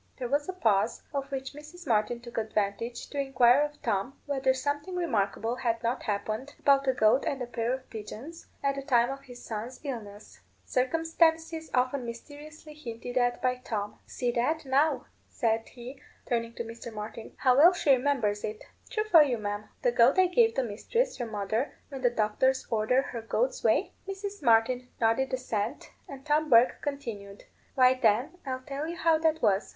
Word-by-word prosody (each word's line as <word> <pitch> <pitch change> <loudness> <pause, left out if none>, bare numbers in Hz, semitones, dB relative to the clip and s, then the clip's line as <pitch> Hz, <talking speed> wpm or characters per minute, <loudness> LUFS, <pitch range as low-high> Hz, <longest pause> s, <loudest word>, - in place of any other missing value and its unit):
There 250 - -3
was 290 +6 0
a - - -2
pause, 225 - +1
of 275 0 -3
which 270 0 -4
Mrs. 305 +4 -12
Martin 230 -1 +1
took 235 -1 -5
advantage 220 +2 -2
to 285 - -3
inquire 265 -1 +4
of 295 0 -2
Tom 225 +4 -1
whether 270 -2 +1
something 290 +6 -2
remarkable 230 - -1
had 230 -2 -1
not 235 +2 -1
happened 215 +6 -3
about 275 -1 +3
a 260 - +4
goat 220 +2 +3
and 275 - -1
a 250 - -3
pair 235 -1 -2
of 260 0 -4
pigeons, 235 +9 -8 0.2
at 275 0 +2
the 275 - -5
time 245 -3 +2
of 275 0 -7
his 245 -2 -12
son's 230 +3 -5
illness 215 -7 -7 0.3
circumstances 325 +3 +1
often 255 +1 +1
mysteriously 295 +6 -10
hinted 245 -4 -7
at 245 0 +1
by 250 0 +1
Tom. 210 -5 -4
"See 245 -2 -2
that, 290 +7 0
now," 280 +4 +2 0.2
said 225 -1 -1
he, 255 +2 -10 0.2
turning 230 -1 -2
to - - -3
Mr. 230 +1 -8
Martin, 220 +1 -7
"how 255 -1 +4
well 330 +5 +8
she 345 -5 +1
remembers 250 -6 +1
it! 215 0 -5 0.3
True 430 -3 -1
for 365 -7 +7
you, 265 -5 +2
ma'am. 205 0 -4
The - - +3
goat 475 - +5
I 375 - +6
gave 450 +5 +3
the 265 - +1
mistress, 270 - -1
your 240 -2 -3
mother, 215 +5 -2
when 270 -2 -7
the 245 - +4
doctors 240 +4 +1
ordered 230 +4 +2
her 235 - -5
goats' - - -1
whey?" - - +2
Mrs. 395 +1 -5
Martin 245 +1 +3
nodded 230 +4 +2
assent, 250 -1 -3 0.2
and 270 0 -10
Tom 305 +1 +1
Bourke 235 0 +5
continued, 220 -9 -6 0.3
"Why, 255 -1 +6
then, 255 +7 +1
I'll 255 -1 -3
tell 280 +3 -5
you 340 - -4
how 325 -2 +3
that 320 0 +1
was. 195 -1 +2
255 Hz, 185 wpm, -29 LUFS, 230-290 Hz, 0.3 s, well